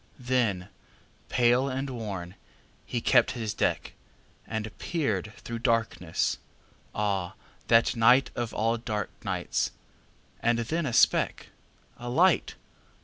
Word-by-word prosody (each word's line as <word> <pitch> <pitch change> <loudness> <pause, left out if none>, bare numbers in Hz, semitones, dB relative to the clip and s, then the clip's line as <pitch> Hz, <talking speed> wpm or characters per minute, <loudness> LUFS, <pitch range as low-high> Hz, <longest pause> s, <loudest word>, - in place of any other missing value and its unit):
Then, 120 -8 0 0.6
pale 125 +2 +3
and 135 +1 -2
worn, 100 -7 -5 0.5
he 120 - -2
kept 120 -1 +4
his 110 -3 -3
deck, - - -1 0.5
And 110 -1 -4
peered 105 - -1
through 115 0 -6
darkness. 115 -8 0 0.6
Ah, 100 -4 -1 0.3
that 115 0 +5
nightOf 120 0 +3
all 115 +2 0
dark 110 -4 -3
nights! - - -1 0.7
And 120 0 +2
then 155 +7 -1
a 120 - -3
speck—A 120 +1 0
light! 170 +7 +3
115 Hz, 105 wpm, -28 LUFS, 105-125 Hz, 0.7 s, that